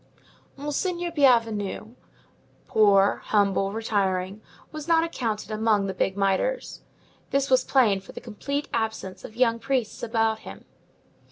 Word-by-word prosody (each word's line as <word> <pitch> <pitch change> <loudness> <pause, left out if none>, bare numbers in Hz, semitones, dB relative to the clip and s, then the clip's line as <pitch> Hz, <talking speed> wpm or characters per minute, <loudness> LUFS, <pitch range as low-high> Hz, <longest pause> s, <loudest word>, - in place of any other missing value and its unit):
Monseigneur 345 +5 -2
Bienvenu, 230 - +1 0.7
poor, 200 -2 +4
humble, 200 -2 +2
retiring, 200 -2 -1 0.3
was 310 0 -7
not 330 -1 +4
accounted 225 -10 -3
among 215 -2 +2
the 190 - -3
big 190 +1 -1
mitres. 200 - -1 0.5
This 275 0 0
was 255 - +5
plain 220 -8 +3
from 195 - -13
the - - -5
complete 280 +6 -4
absence 220 -5 -3
of 220 - -10
young 230 -2 +2
priests 250 -3 -2
about 225 -1 0
him. - - -11
225 Hz, 125 wpm, -25 LUFS, 200-270 Hz, 0.7 s, was